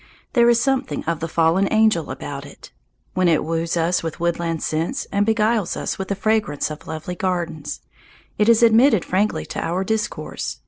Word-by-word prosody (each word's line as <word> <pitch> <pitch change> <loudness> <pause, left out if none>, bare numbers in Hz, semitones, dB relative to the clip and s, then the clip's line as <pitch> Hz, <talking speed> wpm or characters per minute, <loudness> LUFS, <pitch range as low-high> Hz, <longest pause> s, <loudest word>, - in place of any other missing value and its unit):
There 235 -2 +5
is 235 -1 +4
something 270 +1 -1
of 165 -1 -2
the 165 - -3
fallen 165 +4 +2
angel 215 -7 +3
about 140 +1 -6
it. 140 - -13 0.4
When 185 -1 +2
it 165 -2 +3
woos 165 +1 -1
us 170 +2 +1
with 165 +1 -5
woodland 170 -1 -1
scents 165 - -2
and 205 +1 +1
beguiles 220 -2 +1
us - - -3
with 190 - -3
the 200 - -1
fragrance 205 -8 0
of 150 - -9
lovely 160 +3 -5
gardens, 170 -4 -3 0.6
it 210 +2 +4
is 230 0 +5
admitted 230 -2 +5
frankly 200 +4 0
to - - -5
our 175 +3 -1
discourse. 220 +3 -3
180 Hz, 180 wpm, -21 LUFS, 165-220 Hz, 0.6 s, There